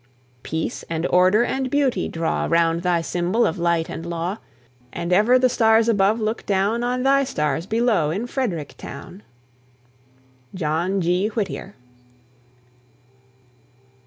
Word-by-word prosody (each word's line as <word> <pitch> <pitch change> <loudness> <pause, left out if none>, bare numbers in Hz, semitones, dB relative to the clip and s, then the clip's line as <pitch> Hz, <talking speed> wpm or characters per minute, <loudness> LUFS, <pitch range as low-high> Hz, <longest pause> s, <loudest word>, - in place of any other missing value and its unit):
Peace 160 +5 -4
and 165 0 -2
order 185 +5 +4
and 265 0 -2
beauty 280 -2 +1
draw 165 0 -1
Round 165 0 +2
thy 175 -1 +1
symbol 180 +7 0
of 160 - -2
light 170 -1 +1
and 165 - -6
law; 170 +4 -4 0.5
And 170 +1 -2
ever 215 +7 +5
the 255 0 +4
stars 225 -2 +3
above 210 0 +2
look 220 +1 -2
down 205 +4 +1
On 250 +1 -1
thy 275 +1 +4
stars 150 - -2
below 220 -8 +1
in 200 +9 -2
Frederick 225 - -3
town! 180 +7 -9 1.3
JOHN 175 +3 -1
G. 180 +4 +1
WHITTIER. 205 -2 -4
190 Hz, 130 wpm, -22 LUFS, 170-230 Hz, 1.3 s, ever